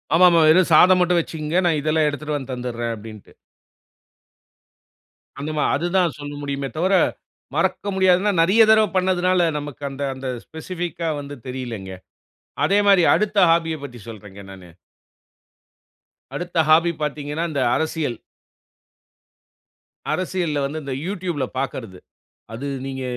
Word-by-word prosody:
ஆமாமா. 175 -1 +6
"வெறும் 180 +3 +5
சாதம் 180 +3 +7
மட்டும் 180 0 +3
வெச்சுக்கங்க. 160 +1 -2
நான் 160 -3 +1
இதெல்லாம் 155 0 +1
எடுத்துட்டு 150 +1 -4
வந்து 135 -1 -7
தந்துட்றேன்" 120 -2 -4
அப்படின்டு. 110 -1 -12 2.1
அந்த 150 +2 -4
மா 150 - +1
அது 170 +5 -1
தான் 175 -5 +1
சொல்ல 145 0 -7
முடியுமே 140 -1 -4
தவர, 185 +4 +1 0.6
மறக்க 205 - 0
முடியாதுனா 190 +2 +3
நெறைய 190 +7 +4
தடவ 220 -1 +5
பண்ணியதனால 185 -1 +2
நமக்கு 145 -1 -9
அந்த, 135 +1 -6
அந்த 130 0 -7 0.2
ஸ்பெசிபிக்கா 170 0 -5
வந்து 145 0 -8
தெரியலங்க. 120 -7 -6 0.7
அதே 200 +1 +3
மாரி 195 -3 +6
அடுத்த 210 0 -1
ஹாபிய 165 -1 +1
பத்தி 125 -3 -9
சொல்றேங்க 105 -3 -11
நானு. 95 -2 -13 1.7
அடுத்த 175 0 -5
ஹாபி 165 +2 +5
பார்த்தீங்கனா, 150 +2 -3
இந்த 140 -3 -1
அரசியல். 155 -6 -2 2.0
அரசியல்ல 175 -5 -2
வந்து 155 +3 -4
இந்த 140 -1 -4
Youtube 180 -4 -4
ல - - +1
பாக்கர்ரது. 115 -8 -5 0.5
அது 120 +5 -6 0.2
நீங்க 135 -1 -5
155 Hz, 125 wpm, -21 LUFS, 135-180 Hz, 2.1 s, சாதம்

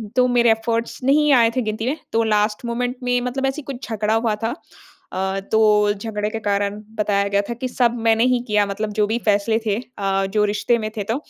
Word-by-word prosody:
तो 250 0 +4
मेरे 240 -2 +4
एफ़र्ट्स 230 +1 -1
नहीं 295 +2 +4
आए 230 -3 +5
थे 255 - +1
गिनती 215 0 -3
में। 290 - -1 0.2
तो 230 0 +3
लास्ट 210 +1 0
मोमेंट 245 +2 -2
में 245 0 +1 0.3
ऐसे 270 +3 -3
कुछ 265 -3 -8
झगड़ा 215 0 0
हुआ 225 -1 +1
था। 225 - +1 0.6
अ, 190 +1 -1
तो 210 -1 +4
झगड़े 210 0 -3
के 225 0 -4
कारण 200 +1 0 0.2
बताया 200 -1 +1
गया 200 0 +2
था - - -1
कि 255 +2 -4
सब 245 -1 +1
मैंने 225 +1 +4
ही 245 - +1
किया 210 -1 +2
मतलब 210 +2 -3
जो 210 - +4
भी 225 +3 -1
फ़ैसले 215 +2 +2
थे, 205 - +1 0.2
अ, 195 0 0
जो 210 -1 +3
रिश्ते 210 +3 +1
में 215 0 -3
थे 205 - -1
तो - - +1
220 Hz, 220 wpm, -21 LUFS, 210-240 Hz, 0.6 s, आए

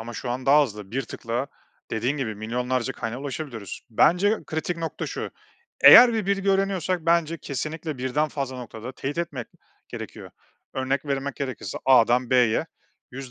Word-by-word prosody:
Ama 115 +1 -7
şu 120 +1 -5
an 125 +1 -4
daha 145 +2 +7
hızlı. 105 -6 -6
Bir 135 +4 -1
tıkla, 120 +2 -4 0.4
dediğin 120 +6 -1
gibi 120 -6 -3
milyonlarca 125 +3 -2
kaynağa 115 +2 -5
ulaşabiliyoruz. 135 - -6
Bence 185 - +4
kritik 160 +2 -3
nokta 165 -2 -4
şu, - - -5 0.5
eğer 245 -1 +10
bir 220 -3 -1
bilgi 200 0 +1
öğreniyorsak 190 -3 0
bence 165 -1 +2
kesinlikle 155 +1 -5
birden 130 +4 0
fazla 135 -3 -4
noktada 120 0 -8
teyit 140 +5 -5
etmek 140 -8 -3 0.4
gerekiyor. - - -8 0.4
Örnek 135 +2 -1
vermek 140 -1 -3
gerekirse 130 -8 -5
A'dan 125 -1 +4
B'ye 125 -3 +3 0.4
100 130 0 -8
135 Hz, 155 wpm, -25 LUFS, 120-160 Hz, 0.5 s, eğer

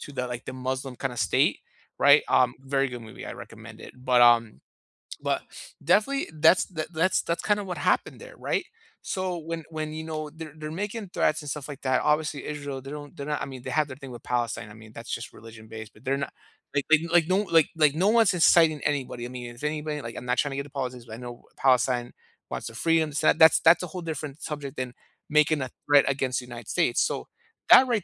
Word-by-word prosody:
to 145 - -9
the, 125 -2 -2
like, 125 0 -6
the - - -6
Muslim 130 0 -4
kinda 125 -2 -3
state, - - +2 0.4
right? 145 +1 +7
Um, 125 -1 +3
very 135 0 0
good 120 -1 -7
movie, 110 -1 -10
I - - -5
recommend - - -11
it. - - -10
But, 125 -1 +2
um, 115 -2 +4 0.6
but - - 0 0.4
definitely, 210 - +2
that's 160 +4 +5
the 160 -4 -5
that's 170 +3 +2
that's 170 - -3
kinda 210 -1 +1
what 180 -2 -5
happened - - 0
there, - - -12
right? - - -1 0.4
So, 185 -2 -3
when 165 0 -5
when, 155 -1 -4
you 160 0 -5
know, 155 -1 -5
they're 155 -1 -9
they're 155 -1 -7
making 205 +4 -4
threats 155 - +1
and 150 - -7
stuff 145 -1 -5
like 140 - -8
that, 130 -1 +2
obviously 150 -1 0
Israel, 145 -3 -5
they 135 +1 -9
don't 145 -1 -8
they're 140 - -6
not 150 -1 -2
I - - -1
mean, 130 -2 -9
they - - -5
have 155 -2 +2
their 130 - -8
thing 135 -2 -10
with 120 -2 -10
Palestine, 120 -4 -2
I - - -11
mean, 110 0 -14
that's 115 +1 -7
just 120 - -5
religion-based, 110 -1 -11
but 105 - -20
they're 135 +1 0
no 140 - -2 0.5
like 140 - +1
like 160 - +7
like 170 -2 +5
no 185 - +3
like 165 -6 +3
like 150 -3 +4
one's 205 +4 +4
inciting 165 -3 +5
anybody. 130 -4 -2
I - - -6
mean, 120 -1 -7
if 120 - -14
anybody 150 0 -2
like, 115 -3 -7
I'm - - -7
not 125 0 0
trying 145 - +1
to 135 - -4
get 140 - -2
to 145 - -13
politics, 125 -3 -5
but 110 - -10
I - - -6
know 120 0 -9
Palestine 125 -2 +2 0.4
wants 115 - -4
their 115 - -9
freedom, 165 +3 +2
so 150 +2 +4
that 160 -1 +7
that's 165 +2 +6
a - - -3
whole 180 +2 -7
different 155 -3 -5
subject 145 -3 -5
than 125 -1 -4 0.4
making 150 0 +3
a 130 - -3 0.2
threat 145 -1 +6
against 130 -2 0
the 125 - -9
United 120 -3 -10
States, 120 - +2
so, - - -1 0.4
that, 260 - +9
right 230 -6 0
145 Hz, 235 wpm, -26 LUFS, 125-160 Hz, 0.6 s, that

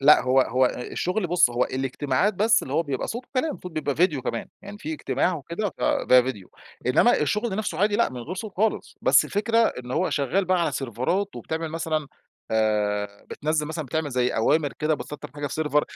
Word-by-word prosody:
لأ، 150 +2 +7
هو 130 +1 +4
هو 130 +1 +3
ال 125 0 -5
الشغل 185 +1 -1
بُصّ 175 -7 +4
هو 120 +1 +1
الاجتماعات 135 +8 0
بس 220 +3 +3
اللي 130 - -6
هو 165 - +3
بيبقى 140 -5 -3
صوت 245 +2 -5
وكلام، 290 +4 -2
صوت 180 - -7
بيبقى 155 -3 -2
فيديو 155 -5 +2
كمان 115 -1 -3
يعني 200 +1 -9
في 310 +6 -5
اجتماع 185 - 0
وكده، 170 +7 -4
فده 125 0 +4
فيديو، 120 -7 -6 0.4
إنما 235 - +5
الشغل 210 +6 0
نفسه 185 -7 -3
عادي 205 +1 +2
لأ 235 - +3
من 125 -1 -7
غير 165 +10 -6
صوت 210 +1 -6
خالص، 220 +3 0
بس - - +5
الفكرة 220 +3 0
إن 125 - +1
هو 180 +8 0
شغال 150 +8 +1
بقى 185 0 +2
على 170 - 0
سيرفرات 135 - -2
وبتعمل 160 0 -4
مثلًا 160 -2 -2 0.4
آآ، 105 -2 0
بتنزّل 150 0 -1
مثلًا 160 0 -4
بتعمل 160 +1 -2
زي 125 -1 +1
أوامر 145 +6 +1
كده 155 +1 +1
بت 150 - -7
Setup - - -9
حاجة 145 0 -3
في 150 +3 -2
Server، 150 0 +2
155 Hz, 205 wpm, -25 LUFS, 130-195 Hz, 0.4 s, لأ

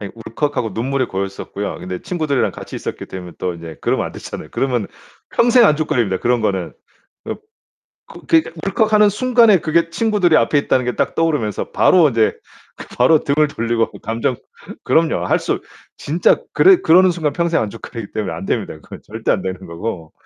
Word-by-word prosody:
아이 100 -2 -6
울컥하고 115 0 -3
눈물이 130 +2 -1
고였었고요. 100 +1 -5
근데 90 -1 -6
친구들이랑 155 -7 -1
같이 - - -8
있었기 - - -6
때문에 90 -2 -8
또 90 -2 -2
이제 80 -2 -9
그러면 - - 0
안 - - -8
되잖아요. - - -8
그러면 125 -6 -1 0.4
평생 240 0 +5
안줏거리입니다, 125 - +1
그런 120 0 +1
거는. 95 -5 -1 0.6
읍 - - -5 0.7
그 - - -13
그러니까 325 - +3
울컥하는 210 +1 +3
순간에 230 -2 +4
그게 165 0 +1
친구들이 205 -5 +2
앞에 115 +4 +2
있다는 130 -2 +1
게 125 - -2
딱 - - -1
떠오르면서 150 -11 -1
바로 170 -5 +5
이제 115 -3 +2 0.4
그 - - -10
바로 140 +5 +4
등을 150 +2 +2
돌리고 115 -4 -1
감정 115 +2 -1 0.5
그럼요. 160 -1 +1
할 - - +3
수 - - -2 0.4
진짜 160 +5 +2 0.2
그래 380 0 +6
그러는 180 +3 +5
순간 160 -4 -2
평생 170 +1 +1
안줏거리기 110 0 -8
때문에 100 -6 -3
안 85 +4 -6
됩니다. - - -2
그건 - - -12
절대 110 +1 -5
안 100 - 0
되는 95 -1 -4
거고. 85 -1 -6
130 Hz, 410 characters per minute, -18 LUFS, 105-170 Hz, 0.7 s, 그래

